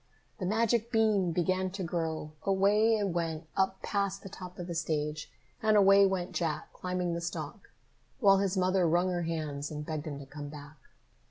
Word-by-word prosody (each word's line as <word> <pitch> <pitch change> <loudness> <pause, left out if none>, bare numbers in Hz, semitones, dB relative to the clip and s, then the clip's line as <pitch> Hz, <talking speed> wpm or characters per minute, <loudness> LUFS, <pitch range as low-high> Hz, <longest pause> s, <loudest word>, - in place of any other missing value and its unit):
The 185 - -2
magic 230 +2 +1
bean 215 -6 +3
began 185 +2 0
to 195 -1 -4
grow! 160 -2 -3
Away 205 +3 +3
it 205 -2 0
went 165 -2 -2
up 190 0 0
past 200 -1 -1
the 195 - -8
top 180 0 -9
of 175 - -5
the 175 - -5
stage, 155 -2 -2 0.3
and 215 -2 +4
away 195 0 +7
went 185 -2 -2
Jack, 160 -3 -2
climbing 180 -1 -2
the 170 - -3
stalk 170 - -6 0.5
while 195 -4 +6
his 195 -1 0
mother 185 -1 +3
wrung 175 +3 +2
her 175 -1 -1
hands 155 -4 -3
and 150 -1 -5
begged 155 -1 -4
him 145 -2 -4
to 140 - -9
come 145 +1 -8
back. 150 +1 -11
180 Hz, 185 wpm, -30 LUFS, 160-195 Hz, 0.5 s, away